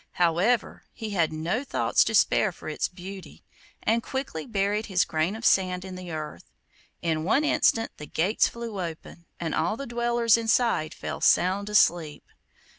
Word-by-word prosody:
However, 180 +7 +1
he 220 -2 -6
had 170 -6 +1
no 165 - -2
thoughts - - +2
to - - -1
spare - - +3
for - - -12
its - - -1
beauty, 185 +1 -10 0.4
and 230 +1 +2
quickly 260 - -5
buried 205 0 -1
his 185 -3 +2
grain 160 +5 -1
of 225 - -7
sand 185 -1 +2
in 190 - -7
the 185 -1 -8
earth. 155 -1 -7 0.5
In 160 -2 0
one 225 - +2
instant 230 -6 +2
the 150 - -9
gates 190 +7 +2
flew 230 -4 -6
open, 170 0 -9
and 165 -3 -3
all 210 +7 0
the 275 - -5
dwellers 235 -1 +2
inside 225 -8 +1
fell - - -6
sound 195 +3 +3
asleep. 170 -7 +2
190 Hz, 165 wpm, -26 LUFS, 170-225 Hz, 0.5 s, spare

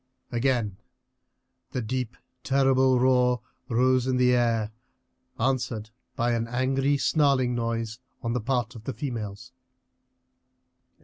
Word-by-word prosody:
Again 120 -5 0 1.0
the 125 - -1
deep 125 0 -3 0.3
terrible 135 -1 +3
roar 125 -1 +3 0.3
rose 130 +2 +3
in 130 -1 +1
the 125 0 +4
air, 115 -3 +1 0.7
answered 120 -4 -1 0.2
by 120 -2 +1
an 115 -1 0
angry 135 +3 +1
snarling 140 -4 +2
noise 115 -1 -2 0.2
on 115 0 -1
the 125 - -1
part 125 +1 -1
of 115 -2 -11
the 135 - -3
females. 115 -2 -5
125 Hz, 115 wpm, -27 LUFS, 115-130 Hz, 1.0 s, the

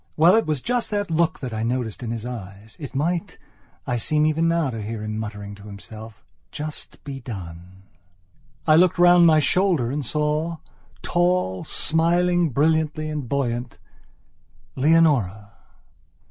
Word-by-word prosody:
Well, 170 +5 +6
it 225 - +2
was 150 -5 -1
just 245 -1 -1
that 205 -4 -2
look 160 0 +1
that 125 -4 -5
I 110 - -3
noticed 115 -2 -2
in 120 - -4
his 115 0 -4
eyes: 105 -3 -8
"It 140 -3 -8
might," 165 +5 -1 0.5
I 120 - -1
seem 150 +6 +1
even 155 +2 +2
now 165 -5 +1
to 115 -2 -5
hear 110 +1 -5
him 110 0 -4
muttering 105 -2 -6
to 100 0 -13
himself, 110 +1 -11 0.3
"just 150 0 -6
be 140 -2 -6
done." 95 -5 -9 0.8
I 155 -1 +6
looked 180 +1 +4
round 175 0 +6
over 170 - +7
my 160 -1 +6
shoulder 160 -5 +2
and 145 +1 -2
saw, 150 +4 -1 0.5
tall, 175 - 0
smiling 175 +2 +2
brilliantly 155 +2 +1
and 145 -6 -4
buoyantLeonora. 125 - -1
145 Hz, 145 wpm, -23 LUFS, 110-165 Hz, 0.8 s, over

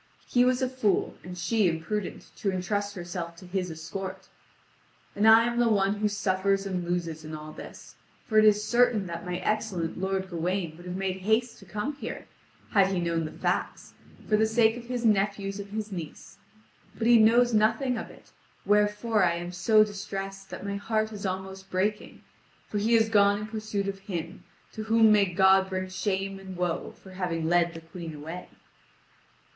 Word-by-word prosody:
He 245 - +3
was 255 +1 +2
a - - +2
fool, 250 -6 0
and 180 0 -8
she 200 +3 +2
imprudent 175 +5 -4
to 200 -5 0
entrust 200 +3 -2
herself 175 -1 -5
to 185 - -13
his 180 0 -2
escort. 185 +4 -6 0.9
And 210 +2 +3
I 225 +1 +8
am 240 0 -1
the 240 -1 +4
one 200 -1 +2
who 210 +1 +1
suffers 195 -1 0
and 185 -2 -2
loses 170 -2 -3
in 155 0 -6
all 155 0 -8
this; - - -11 0.3
for 215 -2 +3
it - - +6
is 210 0 +5
certain 235 -2 +3
that 170 0 -6
my 180 0 -2
excellent 190 -7 -2
lord 190 0 -1
Gawain 175 -1 -2
would 175 +2 -12
have 180 - -4
made 190 -1 -2
haste 220 +5 0
to 195 - -14
come 215 +10 -4
here, - - -6 0.5
had 195 -2 +5
he 190 -2 -1
known 170 -1 0
the 155 - -6
facts, - - -2 0.3
for 215 - +3
the 220 +1 +3
sake 225 0 +3
of 240 -1 -8
his 245 -1 -3
nephews 200 -1 +1
and 200 0 -7
his 215 0 -4
niece. 170 -5 -8 0.6
But 225 - -2
he 235 0 +7
knows 235 +2 +5
nothing 225 +4 +2
of 225 - -5
it, - - -17 0.3
wherefore 210 +1 +2
I 170 -1 +3
am 175 +1 -5
so 215 +4 +4
distressed 195 -1 -6
that - - -7
my 200 0 -2
heart 215 +1 -1
is 205 -2 -4
almost 190 +1 -5
breaking, 205 +3 -2 0.4
for 210 - -2
he 225 +3 +3
is 220 -1 +4
gone 205 -2 +4
in 210 - -5
pursuit 215 -2 -3
of 195 0 -4
him, 180 -2 -6 0.3
to 215 - -5
whom 225 0 +5
may 210 -1 +5
God 190 +1 +4
bring 185 0 -3
shame 195 0 -2
and 190 -1 -9
woe 175 -2 -1
for 190 - -12
having 175 -3 -2
led 170 0 +2
the 165 - -7
Queen 165 -1 -8
away." 160 +5 -8
195 Hz, 190 wpm, -27 LUFS, 180-215 Hz, 0.9 s, I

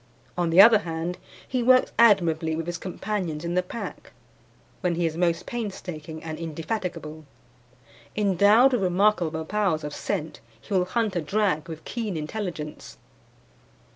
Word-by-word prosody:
On 175 -1 0
the 165 +3 +4
other 215 +1 +9
hand, 165 -1 -4 0.3
he 255 -2 -1
works 255 +1 +4
admirably 170 -8 +4
with 165 0 -3
his 175 0 -4
companions 185 -4 -4
in 170 - -2
the 180 - +2
pack, 180 +6 -8 0.7
when 180 -3 0
he 170 0 0
is 160 -1 -1
most 170 0 0
painstaking 175 -9 -6
and 160 -1 -6
indefatigable. 165 -1 -5 0.9
Endowed 210 +6 +5
with 245 - +1
remarkable 180 -4 +1
powers 190 -4 0
of 150 0 -5
scent, 160 -3 -4 0.2
he 200 - -8
will 185 -2 +3
hunt 215 +1 -1
a 175 - 0
drag 180 -2 0
with 160 -1 -8
keen 220 -7 -3
intelligence. 155 -2 -6
180 Hz, 145 wpm, -25 LUFS, 160-210 Hz, 0.9 s, other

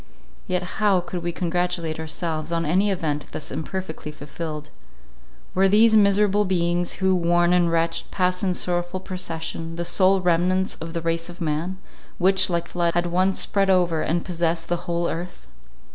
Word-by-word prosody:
Yet 180 0 0 0.2
how 200 -3 +4
could 175 0 -5
we 175 0 -2
congratulate 175 -2 -2
ourselves 160 0 -3
on 165 0 0
any 185 +7 +2
event 155 -6 -2
thus 150 - -5
imperfectly 160 -1 -5
fulfilled? 150 0 -7 0.8
Were 195 +1 +4
these 220 +3 +5
miserable 205 0 +4
beings, 175 -2 0
who, 190 -1 +1
worn 175 0 +3
and 175 -2 +3
wretched, 165 0 0
passed 180 -1 0
in 185 -2 +1
sorrowful 175 +1 -2
procession, 165 -3 -5
the 170 0 -3
sole 190 +2 +3
remnants 180 +1 +1
of 165 +1 -7
the 170 - -2
race 165 +1 -1
of 175 - -10
man, 165 +3 -2 0.4
which, 190 +1 +4
like 170 -1 0
a - - -16
flood, 170 -1 +1
had 175 0 +2
once 185 +2 +1
spread 195 -1 +1
over 175 -4 +3
and 170 +2 -1
possessed 170 -1 -1
the 175 - +1
whole 170 0 0
earth? 175 +2 -6
175 Hz, 170 wpm, -23 LUFS, 165-185 Hz, 0.8 s, these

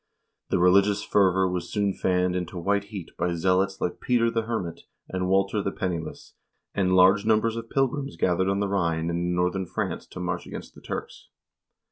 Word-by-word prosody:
The - - +2
religious 100 +3 +4
fervor 95 -2 +3
was 90 -1 -3
soon 100 -2 +1
fanned 90 -1 +1
into 90 0 -4
white 100 +3 0
heat 100 -5 -8
by 85 0 0
zealots 95 +3 +1
like 90 - -2
Peter 115 -2 +2
the 115 - 0
Hermit 95 -8 -3 0.3
and 90 0 -2
Walter 95 +2 +2
the 100 - -2
Penniless, 85 -5 -5 0.4
and 95 -2 +2
large 95 +2 +6
numbers 110 +1 +2
of 115 0 -6
pilgrims 135 +1 -1
gathered 95 +1 +1
on 100 +1 0
the 100 - +1
Rhine 85 -4 0
and 85 - -1
in 90 0 -1
northern 90 +1 0
France - - -3
to - - -9
march 90 -1 -3
against - - -8
the - - -15
Turks. - - -7
95 Hz, 185 wpm, -26 LUFS, 90-100 Hz, 0.4 s, large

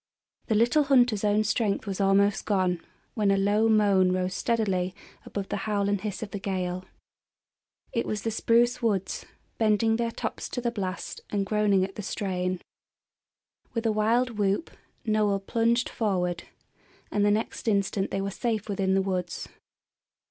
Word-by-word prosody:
The 220 - +1
little 240 +7 +4
hunter's 245 -6 +4
own 210 +1 +3
strength 215 -1 0
was 195 -1 -3
almost 200 +1 +3
gone, 185 -4 +1 0.3
when 210 -4 +1
a 195 - +4
low 205 +3 +3
moan 200 -4 +4
rose 185 0 0
steadily 195 -6 0 0.3
above 200 -1 -4
the - - -1
howl 200 -1 +1
and 200 -1 0
hiss 210 -1 -4
of 205 - -7
the 205 - -4
gale. 185 -2 -3 1.1
It 235 - 0
was 210 -2 -3
the 225 - -1
spruce 235 +3 +2
woods, 200 -5 -1 0.3
bending 225 0 +3
their 235 0 0
tops 230 - -4
to - - -3
the 240 -1 -1
blast 190 -4 -4
and 200 -1 0
groaning 205 -2 +2
at 195 - -11
the - - -3
strain. 185 -3 -2 1.1
With 230 0 -1
a 225 - +3
wild 225 +2 +1
whoop 200 +10 0 0.3
Noel 210 -2 +2
plunged 235 +4 +1
forward, 180 -6 -1 0.7
and 205 - +1
the 205 - +4
next 215 +2 -1
instant 200 -2 +1
they 195 - -2
were 200 0 -2
safe 220 0 -2
within 195 -2 +1
the 195 - +2
woods. 180 -3 -3
205 Hz, 165 wpm, -27 LUFS, 195-225 Hz, 1.1 s, little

